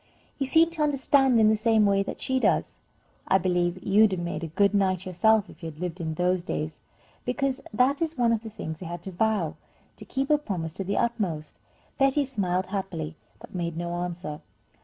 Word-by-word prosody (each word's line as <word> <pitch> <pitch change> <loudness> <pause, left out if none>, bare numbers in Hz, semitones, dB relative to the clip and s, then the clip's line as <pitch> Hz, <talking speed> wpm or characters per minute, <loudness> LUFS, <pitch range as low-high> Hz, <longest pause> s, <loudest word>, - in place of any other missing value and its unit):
You 275 - 0
seem 325 +4 +4
to 330 -2 -4
understand 270 -3 +3
in 215 - +6
the 220 - +4
same 220 0 +3
way 200 -1 +3
that 195 - -5
she 260 0 +1
does. - - +1 0.5
I 190 - +5
believe 180 -1 0
you'd 205 +1 +5
have 185 - -2
made 170 -2 -4
a - - -2
good 200 +6 +2
knight 190 -2 +1
yourself 210 +3 +3
if 165 - -15
you 165 - -4
had 155 -1 -13
lived 180 0 -4
in 160 -1 -3
those 180 +1 +1
days, 155 -3 -4 0.4
because 275 +1 -1
that 255 +7 +2
is 325 -2 -1
one 235 -2 +3
of 225 - 0
the 225 - -7
things 165 -7 -6
they 185 - -7
had 175 0 -6
to 190 - -6
vow, 195 -4 0 0.4
to - - -5
keep 270 +2 -2
a 300 - +5
promise 175 - -4
to 195 - -1
the 200 +2 -2
utmost." 195 -11 -2 0.4
Betty 275 +1 +3
smiled 190 -8 -1
happily, 175 -6 -3 0.2
but - - -13
made 170 -2 -3
no 175 0 -3
answer. 175 -3 -5
195 Hz, 210 wpm, -26 LUFS, 175-235 Hz, 0.5 s, in